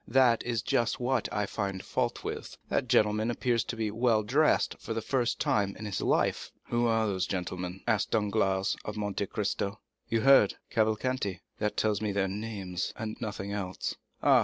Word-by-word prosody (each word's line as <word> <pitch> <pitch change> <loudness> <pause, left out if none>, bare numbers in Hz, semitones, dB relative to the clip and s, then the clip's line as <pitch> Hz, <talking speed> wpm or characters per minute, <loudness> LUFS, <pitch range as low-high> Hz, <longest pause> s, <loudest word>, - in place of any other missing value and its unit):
"That 120 -2 +4
is 115 -2 -1
just 120 0 +1
what 125 -3 0
I 105 - 0
find 100 -2 -3
fault - - -1
with. - - -5
That - - 0
gentleman 105 +2 +3
appears 120 -1 +1
to - - -4
be 110 -2 -1
well 115 -1 +2
dressed 145 +8 +3
for 115 - -4
the 115 - -1
first 125 -4 0
time 100 -2 +1
in 110 - -7
his 100 -2 -2
life." - - +1 0.2
"Who 120 0 +2
are 115 -1 +2
those 95 -3 0
gentlemen?" 90 0 -4
asked 105 -3 +1
Danglars 100 -3 +1
of 105 0 -5
Monte 100 -1 -2
Cristo. 100 0 -2 0.3
"You 115 -1 +1
heard—Cavalcanti." 110 -4 +2 0.2
"That 105 -1 -1
tells 105 -1 +1
me 105 -1 0
their 100 -1 +1
name, 100 -2 -5 0.2
and 110 -1 -4
nothing 100 -3 -4
else." 95 -3 -3 0.3
"Ah! - - +7
105 Hz, 175 wpm, -30 LUFS, 100-115 Hz, 0.3 s, Ah